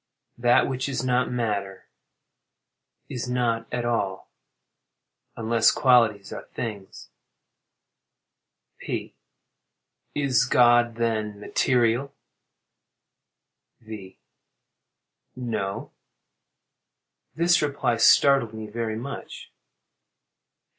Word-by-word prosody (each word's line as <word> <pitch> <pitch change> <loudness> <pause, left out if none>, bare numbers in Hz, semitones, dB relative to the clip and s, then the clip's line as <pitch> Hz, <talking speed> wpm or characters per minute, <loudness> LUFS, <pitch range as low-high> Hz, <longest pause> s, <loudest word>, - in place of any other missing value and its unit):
That 120 0 +4
which 130 +1 -3
is 130 -2 -2
not 125 0 +1
matter, 105 -5 -3 1.2
is 125 0 -5
not 120 -2 -1
at 120 -1 -2
all—unless 115 +1 -3
qualities 115 -7 +3
are - - -6
things. 105 -5 -7 1.7
P. - - -5 1.0
Is 135 -4 +2
God, 120 -1 +4
then, 110 -3 -2
material? 125 +4 +1 1.7
V. 105 -4 -10 1.2
No. 110 -6 -4 1.5
[_This 175 +1 +3
reply 140 -5 0
startled 115 -1 +4
me 110 0 -6
very 110 0 -4
much. 135 +5 -8
120 Hz, 70 wpm, -25 LUFS, 110-125 Hz, 1.7 s, That